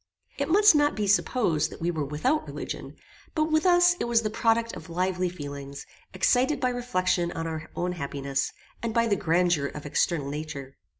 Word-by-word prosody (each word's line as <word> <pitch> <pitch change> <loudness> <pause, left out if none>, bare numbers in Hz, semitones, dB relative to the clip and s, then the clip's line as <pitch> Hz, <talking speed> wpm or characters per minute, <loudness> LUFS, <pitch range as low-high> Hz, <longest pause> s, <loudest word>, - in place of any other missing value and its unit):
It - - -1
must 410 +3 +7
not 290 -1 +3
be 210 - -1
supposed 175 - +2
that - - -11
we 170 +1 0
were 155 -3 -2
without 155 - 0
religion, - - -6 0.4
but 310 0 +1
with 315 +4 +3
us 355 0 +5
it - - -1
was 235 -1 +2
the 215 - -1
product 230 +1 +1
of - - -10
lively 180 +1 0
feelings, 140 -4 -7 0.3
excited 260 +4 +2
by 255 - +1
reflection 185 -8 0
on 165 - -4
our 160 -1 -5
own 180 +1 -1
happiness, 140 -4 -2 0.3
and 230 0 -3
by 230 0 +4
the 215 -3 +2
grandeur 170 -5 +1
of 150 +1 -8
external 145 0 0
nature. 140 -2 -6
180 Hz, 185 wpm, -27 LUFS, 155-245 Hz, 0.4 s, must